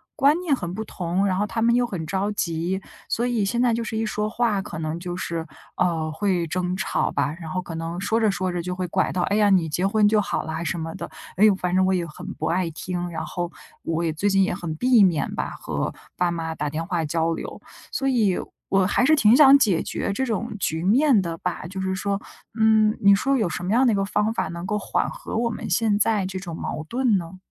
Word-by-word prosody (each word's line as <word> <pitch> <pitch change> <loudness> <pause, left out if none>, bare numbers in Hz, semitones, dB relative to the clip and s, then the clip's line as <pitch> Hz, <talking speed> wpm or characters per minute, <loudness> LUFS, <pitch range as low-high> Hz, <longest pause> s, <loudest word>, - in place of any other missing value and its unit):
观 290 +2 +4
念 325 -6 +2
很 175 -7 -5
不 220 - -4
同， 180 +1 -1
然 185 -2 +1
后 205 - +1
他 225 - -3
们 235 +1 +4
又 245 0 +3
很 175 -7 -4
着 195 +3 -1
急， 175 0 -2 0.3
所 240 - 0
以 235 -4 0
现 235 +4 0
在 245 -2 +3
就 230 - -1
是 225 -1 -4
一 225 - 0
说 210 0 -2
话， 225 -3 0
可 175 -5 -7
能 160 +1 -3
就 175 0 -5
是， 165 -3 -3 0.3
呃， 165 -3 0
会 180 0 0
争 180 +2 -1
吵 - - 0
吧。 140 +1 0
然 160 -2 -7
后 185 +3 -2
可 175 -2 -7
能 165 +2 -4
说 220 +3 +1
着 220 -2 +3
说 185 -1 -2
着 175 - -2
就 180 +1 -4
会 185 -1 -3
拐 185 +2 0
到， 180 - -1
哎 200 - 0
呀， 205 -1 +4
你 180 -4 +3
结 180 +5 0
婚 210 0 +3
就 210 0 +3
好 - - -2
啦 160 +1 -4
什 170 +1 -2
么 160 0 -4
的， - - -6 0.3
哎 200 - +2
呦， 215 -2 +7
反 180 -1 -2
正 185 0 +4
我 190 - +2
也 175 -2 0
很 170 +3 -10
不 - - -4
爱 175 0 0
听， 175 +2 -4
然 160 -1 -4
后 175 +2 -4 0.3
我 165 +1 -1
也 160 -2 0
最 200 +6 0
近 195 0 +4
也 - - 0
很 175 -4 -4
避 245 +4 +5
免 175 -6 +1
吧， - - -2
和 - - -3 0.2
爸 175 -1 +1
妈 165 -1 -3
打 150 -1 -2
电 160 +3 -3
话 170 -2 -1
交 165 +2 0
流， - - -7 0.3
所 270 - -1
以 220 -8 +2 0.3
我 195 -1 +3
还 225 +5 +2
是 310 +3 +5
挺 225 -4 +5
想 280 -1 +8
解 195 -10 +2
决 200 - -3
这 265 - -1
种 230 -1 -3
局 160 -2 -1
面 235 +3 +4
的 165 -2 -4
吧， - - -3
就 190 +2 -5
是 190 0 -1
说 200 +1 -2 0.4
嗯， 220 -1 +4
你 200 0 +7
说 270 +7 +1
有 210 -7 +1
什 175 - -4
么 185 - -2
样 260 +3 +4
的 240 - +4
一 - - +1
个 195 - 0
方 210 +2 0
法 - - -1
能 170 +2 -6
够 210 +2 -1
缓 - - -1
和 - - -7
我 235 0 +1
们 - - -5
现 220 -3 +2
在 210 -2 +2
这 190 0 -4
种 175 -3 -6
矛 155 -1 -4
盾 245 -4 +2
呢？ 180 +1 -6
190 Hz, 275 characters per minute, -24 LUFS, 170-215 Hz, 0.4 s, 想